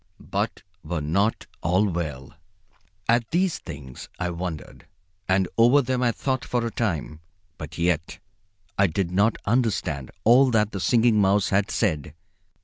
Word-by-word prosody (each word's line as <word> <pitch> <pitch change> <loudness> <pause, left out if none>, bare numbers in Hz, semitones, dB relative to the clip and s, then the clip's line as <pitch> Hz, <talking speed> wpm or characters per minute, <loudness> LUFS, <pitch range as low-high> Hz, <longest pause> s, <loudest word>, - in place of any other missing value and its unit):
But - - -2 0.2
were 85 -2 -3
not 100 +9 0 0.2
all 90 +5 +2
well?" 75 -7 -4 0.7
At 115 0 +2
these 180 0 +1
things 65 -3 -9
I 90 -1 -2
wondered, 85 -3 -6 0.4
and 95 0 +3
over 125 +5 +6
them 125 0 -1
I 120 -1 +3
thought 130 +2 -2
for 120 -1 -1
a 115 - -2
time, 85 -10 -2 0.4
but 75 0 -8
yet 85 -1 0 0.6
I 100 - +5
did 90 +1 -2
not 100 +4 +2
understand 100 - 0
all 130 +4 +6
that 110 -3 +2
the 100 - -4
Singing 115 +1 +3
Mouse 100 +1 +3
had 100 +1 +1
said. 75 -8 -1
100 Hz, 145 wpm, -24 LUFS, 85-115 Hz, 0.7 s, over